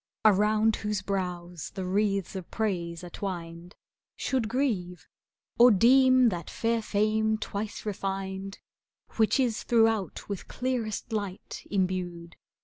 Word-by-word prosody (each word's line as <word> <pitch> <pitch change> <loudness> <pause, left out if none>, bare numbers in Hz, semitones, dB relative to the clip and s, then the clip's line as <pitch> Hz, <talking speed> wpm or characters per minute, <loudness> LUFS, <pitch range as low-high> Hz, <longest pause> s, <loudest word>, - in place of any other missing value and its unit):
Around 215 +1 +4
whose 210 -2 -2
brows 180 -4 -3
the 190 -2 -3
wreaths 195 0 0
of 185 -3 -6
praise 175 -6 -2
are 175 - -8
twined, 175 -2 -6 0.4
Should 250 -5 -1
grieve, 190 - -1 0.5
or 245 +1 +9
deem 255 +3 +6
that 175 -5 -5
fair 230 0 0
fame 215 +1 +1
twice 210 0 -5
refined, 195 -1 -4 0.5
^ - - -18
Which 220 +4 +3
is 240 -4 +1
throughout 225 -4 +1
with 200 -3 -5
clearest 245 -3 -3
light 200 -3 -4
imbued. 180 -3 -2
205 Hz, 125 wpm, -28 LUFS, 185-220 Hz, 0.5 s, or